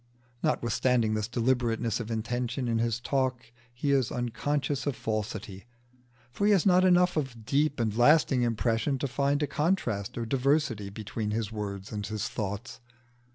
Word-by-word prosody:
Notwithstanding 115 -1 +1
this 105 -1 -1
deliberateness 120 -2 0
of 115 -2 -5
intention 120 +3 -2
in 115 -1 +1
his 115 0 0
talk 125 -2 -1 0.2
he 125 +4 -1
is 135 -5 +2
unconscious 135 +4 -2
of 140 - 0
falsity, 110 -2 -4 0.6
for 200 +11 0
he 210 - +6
has 190 - +3
not 185 -1 +5
enough 180 -1 +4
of 125 -7 -3
deep 145 +3 +1
and 110 -3 0
lasting 135 +1 +4
impression 115 +2 0
to 140 - -2
find 140 +3 0
a - - +3
contrast 130 - -1
or 115 - -2
diversity 135 -4 +1
between 105 +1 -4
his 110 0 -2
words 100 -3 -5
and 105 -2 -4
his 110 -1 -3
thoughts. 105 +5 -5
120 Hz, 155 wpm, -28 LUFS, 110-140 Hz, 0.6 s, he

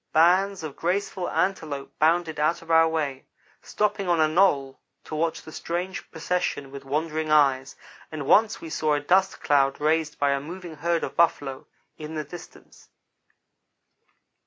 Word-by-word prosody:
Bands 185 +3 +3
of 150 -3 -6
graceful 185 +1 -2
antelope 155 -7 -2
bounded 160 0 +2
out 155 +3 +1
of 165 - -7
our 165 0 +6
way, 145 -5 -3 0.3
stopping 205 -3 -1
on 170 -2 +3
a 155 - +5
knoll 150 -6 +2 0.2
to - - -10
watch 160 +1 -1
the 155 - -11
strange 175 +4 -4
procession 160 -4 -2
with 140 0 -9
wondering 155 +3 -2
eyes, 135 -3 +3 0.4
and 150 -3 -5
once 215 +8 +4
we 165 - -9
saw 155 -1 +1
a - - 0
dust 185 +6 +2
cloud 140 -1 +2
raised 155 0 0
by 145 -1 +2
a 140 0 0
moving 170 +1 -9
herd 170 +2 0
of - - -4
buffalo, 145 -5 +1 0.3
in 155 +1 -7
the 155 - -2
distance. 170 +4 -13
160 Hz, 160 wpm, -25 LUFS, 145-175 Hz, 0.4 s, our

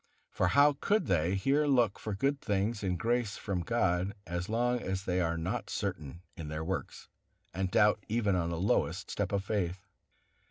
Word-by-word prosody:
For - - +1
how 145 0 +5
could 210 +2 +2
they 90 -1 +1
here 140 +9 +2
look 120 -7 +3
for 105 -2 -4
good 140 +7 0
things 105 +2 0
and 90 -2 0
grace 115 0 0
from 95 -3 -2
God, 95 -2 0
as 90 +2 -4
long 120 +2 +1
as 95 0 -3
they 90 -1 0
are 85 -1 0
not 95 +6 -3
certain 85 -4 -4
in 80 - -7
their 75 +1 -4
works, 95 +4 -4 0.5
and 95 +1 -1
doubt 105 +1 +3
even 105 -3 +1
on 85 -2 0
the 85 - -3
lowest 95 +5 0
step - - -2
of 100 -1 0
faith. 95 -2 -2
95 Hz, 185 wpm, -31 LUFS, 90-115 Hz, 0.5 s, how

